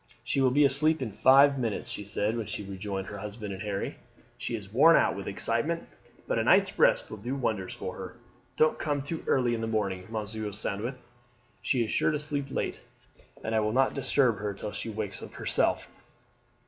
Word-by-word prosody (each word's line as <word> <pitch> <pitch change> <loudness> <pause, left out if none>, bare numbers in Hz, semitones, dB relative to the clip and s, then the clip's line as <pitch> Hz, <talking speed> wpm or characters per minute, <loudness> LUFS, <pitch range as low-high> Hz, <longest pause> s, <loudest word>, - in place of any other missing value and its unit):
"She 130 +3 0
will 130 - +5
be 145 +3 +4
asleep 155 +4 +4
in 115 - -4
five 140 +4 +6
minutes," 115 -4 -2
she 105 - -5
said 105 +2 -1
when 115 -3 -3
she 105 0 -5
rejoined 95 0 -4
her 100 +1 -7
husband 105 0 -6
and 95 - -7
Harry. 100 -2 -3 0.4
"She 120 - -4
is 100 -2 -8
worn 160 +7 +7
out - - +3
with - - -6
excitement, - - -1 0.4
but - - 0
a - - +1
night's - - +4
rest - - +4
will 110 - -6
do 120 +6 -3
wonders 110 -8 -2
for - - -5
her. - - -8 0.4
Don't 155 - +3
come 145 -2 -1
too 160 +3 -4
early 125 -3 +2
in 115 - -2
the 115 - -2
morning, 100 -4 -2
Monsieur 110 -1 -4
Sandwith; 105 +5 -4 0.6
she 125 -4 +1
is 110 - -5
sure - - +2
to 155 - 0
sleep 145 -2 -3
late, - - -3 0.6
and 110 - -2
I 110 - +3
would 110 +1 0
not 135 0 +3
disturb 130 -5 +2
her 100 -1 -3
till 105 - -5
she 115 - -5
wakes 105 -2 -4
of - - -10
herself." - - 0
110 Hz, 205 wpm, -29 LUFS, 105-135 Hz, 0.6 s, worn